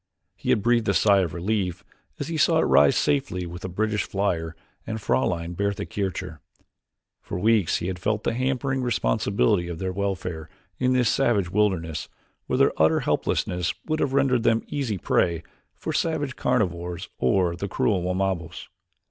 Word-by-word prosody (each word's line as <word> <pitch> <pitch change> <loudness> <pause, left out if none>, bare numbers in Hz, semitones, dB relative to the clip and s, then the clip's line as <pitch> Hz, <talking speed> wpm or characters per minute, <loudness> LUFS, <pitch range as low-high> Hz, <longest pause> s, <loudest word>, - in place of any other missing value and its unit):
He - - -6
had 100 - +3
breathed 120 -3 +2
a 100 - +2
sigh 100 -2 +5
of 85 -3 -1
relief 90 -1 -1 0.4
as - - -3
he 165 - -3
saw 160 +1 +3
it - - +3
rise 70 +1 +5
safely 135 -11 0
with 85 +1 -8
the 95 - -5
British 105 +3 0
flier 85 -5 -1 0.3
and 110 0 -3
Fraulein 85 -6 0
Bertha 100 +2 -2
Kircher. 95 -5 -4 0.8
For - - -5
weeks 105 -2 +3
he - - -4
had 90 0 -3
felt 105 +3 -1
the - - 0
hampering 130 +1 -1
responsibility 85 - +1
of 85 -2 -5
their 95 +1 -3
welfare 90 -5 -3 0.3
in 130 0 +2
this 125 -2 +3
savage 100 -5 +2
wilderness 95 -6 0 0.4
where - - 0
their - - +2
utter - - +4
helplessness 90 -2 0
would 155 0 -1
have 140 -3 0
rendered 135 -3 +3
them 115 0 +2
easy 130 -8 -2
prey 85 -2 +1 0.3
for - - -4
the - - +2
savage 150 -5 -2
carnivores 90 -7 -1
or 85 +7 +2
the 100 +3 -4
cruel 95 0 +1
Wamabos. 90 -2 -2
95 Hz, 170 wpm, -25 LUFS, 85-115 Hz, 0.8 s, sigh